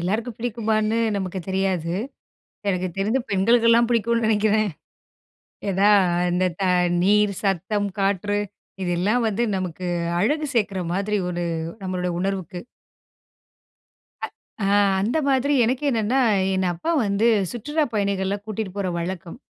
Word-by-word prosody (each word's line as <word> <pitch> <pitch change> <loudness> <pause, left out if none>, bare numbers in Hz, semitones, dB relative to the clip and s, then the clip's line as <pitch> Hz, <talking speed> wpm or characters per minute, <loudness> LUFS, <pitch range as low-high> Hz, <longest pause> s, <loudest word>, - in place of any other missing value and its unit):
எல்லாருக்கும் 220 +6 -2
பிடிக்குமான்னு 220 -1 0 0.2
நமக்கு 190 -1 -3
தெரியாது. 190 -3 0 0.8
எனக்கு 185 -1 -1
தெரிந்து 220 +7 +1
பெண்களுக்கெல்லாம் 230 +4 +4
புடிக்கும்னு 230 0 +1
நெனைக்கிறேன் 215 -1 +2 1.0
ஏதா 195 +3 +3 0.4
இந்த 180 +1 +1 0.6
நீர், 205 +1 +3
சத்தம், 200 +2 0
காற்று, 200 +1 +1 0.4
இதெல்லாம் 185 +7 +1
வந்து 220 +3 0
நமக்கு 185 -1 -4 0.3
அழகு 295 - +1
சேர்க்குற 200 -5 0
மாதிரி 200 +2 0
ஒரு 175 0 -2 0.4
நம்மளுடைய 180 -1 -2
உணர்வுக்கு. 190 -2 -3 1.6
அ - - -3 0.7
அந்த 235 +10 0
மாதிரி 275 +2 +2
எனக்கு 255 +5 -1
என்னென்னா, 230 +2 +1 0.4
என் 190 0 +1
அப்பா 250 - -3 0.2
வந்து 200 +3 +1 0.3
சுற்றுலாப் 295 +3 -2
பயணிகள 200 -1 0
கூட்டிட்டு 215 -3 -4
போற 200 -2 -1
வழக்கம். 175 +2 -5
205 Hz, 110 wpm, -23 LUFS, 190-230 Hz, 1.6 s, பெண்களுக்கெல்லாம்